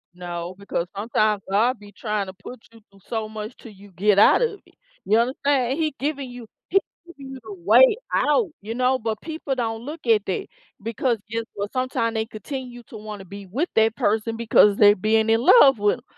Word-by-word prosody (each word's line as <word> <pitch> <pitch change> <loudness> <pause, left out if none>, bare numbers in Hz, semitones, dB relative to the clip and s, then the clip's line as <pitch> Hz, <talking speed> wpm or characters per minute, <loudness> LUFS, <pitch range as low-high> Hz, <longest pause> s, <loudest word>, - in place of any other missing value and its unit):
No, 175 0 -6
because 180 -3 -3
sometimes 215 -1 0
God 225 +6 +2
be 205 -1 -14
tryna 205 -4 -4
put 235 +4 -10
you 225 -1 -18
through 195 - -21
so 220 -2 -3
much 215 +2 -7
till 230 - -12
you 200 0 -16
get 200 +2 +2
out 210 - +6
of 450 -4 -1
it, - - -25 0.3
you 215 - +3
understand? 265 +2 0
He 310 -3 -1
giving 280 -2 -3
you 245 -1 -10 0.2
he 390 - +4 0.3
giving 280 -6 -11
you 265 - -8
the 215 -2 -8
way 230 - +5 0.2
out, 435 -8 +2
you 220 +3 -6
know? 255 +1 +1
But 220 -1 -3
people 315 -4 -4
don't 225 -2 -3
look 300 +6 -8
at 215 -3 +3
that 185 - -3 0.4
because, 230 +2 -1
guess 230 0 -2
what, 200 0 -5
sometime 255 -3 -1
they 220 -1 -1
continue 245 +2 -8
to 235 - -9
wanna 210 -2 -8
be 200 +1 -10
with 275 - -2
that 220 0 +3
person 220 +2 0
because 215 -3 +4
they 205 -1 +7
being 220 +3 +1
in 225 +1 +3
love 270 - +6
with 205 0 +2
'em. 240 - -18
225 Hz, 205 wpm, -23 LUFS, 205-255 Hz, 0.4 s, they